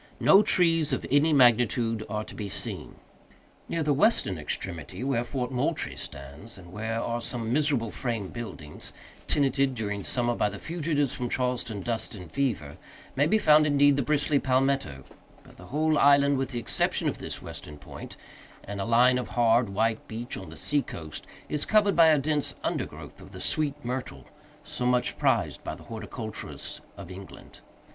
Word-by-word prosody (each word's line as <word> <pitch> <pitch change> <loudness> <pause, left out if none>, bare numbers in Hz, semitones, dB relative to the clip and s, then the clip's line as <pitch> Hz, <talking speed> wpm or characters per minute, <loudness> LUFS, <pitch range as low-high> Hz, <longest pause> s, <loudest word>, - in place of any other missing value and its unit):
No 195 - +7
trees 165 -6 +3
of 130 - -1
any 145 +3 +4
magnitude 120 -3 +4
are 105 +1 -2
to - - -11
be 105 -2 -5
seen. - - -5 0.7
Near 165 - -1
the 150 -1 +2
western 140 - +2
extremity, 85 - -3
where 130 -3 +1
Fort 125 +1 -3
Moultrie 125 -1 -1
stands, 70 +11 -7
and 85 -2 -13
where 110 +2 -2
are 120 +1 -2
some 115 -1 -2
miserable 140 -6 +1
frame 115 -7 -3
buildings, 95 -11 -7 0.3
tenanted, 135 -2 +2
during 105 -3 -3
summer, 120 +2 0
by 105 - +1
the 100 - -7
fugitives 155 -3 -1
from 125 -1 -3
Charleston 125 -5 -1
dust 115 +1 -2
and 90 -3 -10
fever, 110 - -2 0.4
may 145 +3 +3
be 220 - +4
found, 150 -6 +5
indeed, 145 -1 +5
the 140 - +1
bristly 145 +1 +2
palmetto; 130 - 0 0.4
but - - -18
the 90 - -12
whole 155 +4 +1
island, 140 -1 +5
with 135 -2 -1
the 125 - -5
exception 115 - 0
of - - -2
this - - -6
western 75 - -8
point, 70 - -10 0.5
and 100 0 -5
a - - -2
line 125 +2 +4
of 125 - -4
hard, 115 -1 +3
white 110 +3 0
beach 115 +3 -6
on - - -8
the - - -11
seacoast, 85 - -2 0.2
is 150 -1 -1
covered 205 -3 +3
with 165 0 +7
a 155 -1 +6
dense 145 +1 0
undergrowth - - -4
of - - -13
the - - -8
sweet 150 -3 0
myrtle, 125 +1 -4 0.4
so 150 -4 -5
much 125 0 +1
prized - - +1
by - - -4
the - - -14
horticulturists 110 0 -7 0.2
of 95 -2 -9
England. 95 +1 -11
125 Hz, 175 wpm, -27 LUFS, 110-145 Hz, 0.7 s, No